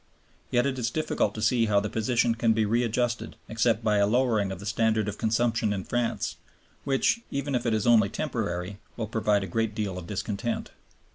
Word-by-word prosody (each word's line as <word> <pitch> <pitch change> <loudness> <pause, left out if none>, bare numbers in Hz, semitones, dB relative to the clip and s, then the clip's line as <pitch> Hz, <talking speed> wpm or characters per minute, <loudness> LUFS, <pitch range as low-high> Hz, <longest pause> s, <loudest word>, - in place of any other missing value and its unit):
Yet 120 +1 +2
it 135 -2 -1
is 120 -1 0
difficult 155 -7 -1
to 110 - -4
see 115 0 +3
how 100 -1 +4
the 105 - -2
position 115 +2 +1
can 115 0 +2
be 110 -1 +1
readjusted 120 +2 0
except 115 0 +1
by 105 -1 +2
a 100 0 +4
lowering 110 -4 +2
of 95 - -6
the 100 - -9
standard 110 0 +1
of 105 - -5
consumption 115 -1 +1
in 100 -2 -2
France, 120 +2 -2 0.5
which, 140 - +2
even 140 0 -3
if 120 -1 0
it 115 - +2
is 105 - -1
only 110 -4 +5
temporary, 100 - -3 0.2
will 115 - -2
provoke 105 -2 +1
a - - -2
great 110 +3 -1
deal 100 -5 -2
of 85 - -10
discontent. 105 +3 -3
110 Hz, 200 wpm, -27 LUFS, 105-120 Hz, 0.5 s, only